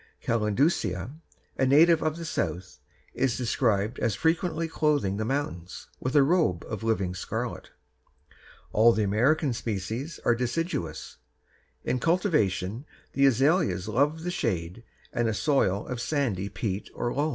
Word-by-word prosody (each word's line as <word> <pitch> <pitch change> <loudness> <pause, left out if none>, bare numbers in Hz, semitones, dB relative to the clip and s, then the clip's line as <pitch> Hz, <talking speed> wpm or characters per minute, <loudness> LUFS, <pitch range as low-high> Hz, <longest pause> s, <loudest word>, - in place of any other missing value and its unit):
calendulcea_, 110 - +1 0.5
a 130 - +4
native 160 +4 +6
of 155 0 -1
the 170 - -6
South, 90 - -3 0.3
is 130 -3 0
described 115 -3 0
as 115 -4 0
frequently 165 - 0
clothing 145 -11 0
the 110 - -1
mountains 110 -9 -4
with 130 +2 -3
a 145 - +7
robe 145 - +1
of 110 -2 -5
living 105 -5 0
scarlet. 90 - -4 1.0
All 115 +2 +6
the 110 - +1
American 125 +8 +2
species 115 - -4
are 120 - +5
deciduous. 120 - -3 0.7
In 125 - -1
cultivation 135 - 0 0.3
the 140 0 +4
azaleas 135 - +2
love 145 +8 +1
the 180 - -2
shade 95 - -2 0.3
and 120 -2 +1
a 110 - -1
soil 105 -10 +1
of 125 -2 -4
sandy 120 -9 -1
peat 100 -3 -4
or 120 - -2
loam. 145 +3 0
120 Hz, 140 wpm, -27 LUFS, 100-150 Hz, 1.0 s, a